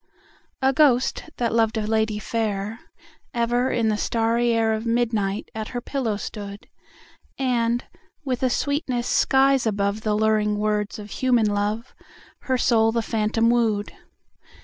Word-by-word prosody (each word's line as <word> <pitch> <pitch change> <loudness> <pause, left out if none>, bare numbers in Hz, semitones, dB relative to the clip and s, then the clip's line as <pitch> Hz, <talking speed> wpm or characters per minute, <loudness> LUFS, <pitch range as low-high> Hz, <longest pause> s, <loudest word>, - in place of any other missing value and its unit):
A 265 +1 +4
ghost, 265 +1 +2
that 235 -2 0
loved 225 -1 +2
a 215 - -1
lady 220 0 0
fair, 215 0 -3 0.6
Ever 240 +2 +1
in 230 -2 +1
the 210 - 0
starry 230 +2 +1
air 225 -1 +2
Of 220 0 -2
midnight 225 -4 -1
at 220 -1 -4
her 245 - -4
pillow 240 -4 -2
stood; 205 -1 -7 0.7
And, 240 -2 0 0.4
with 255 -3 -2
a 260 - +2
sweetness 255 -2 -1
skies 270 -2 +3
above 200 0 -1
The 215 -1 0
luring 215 -1 +2
words 210 0 -1
of 210 -1 -9
human 250 -4 +2
love, 210 +4 -2 0.5
Her 260 -1 -1
soul 225 -2 +3
the 230 0 -1
phantom 225 +1 +1
wooed. 220 -4 0
225 Hz, 145 wpm, -23 LUFS, 215-240 Hz, 0.7 s, A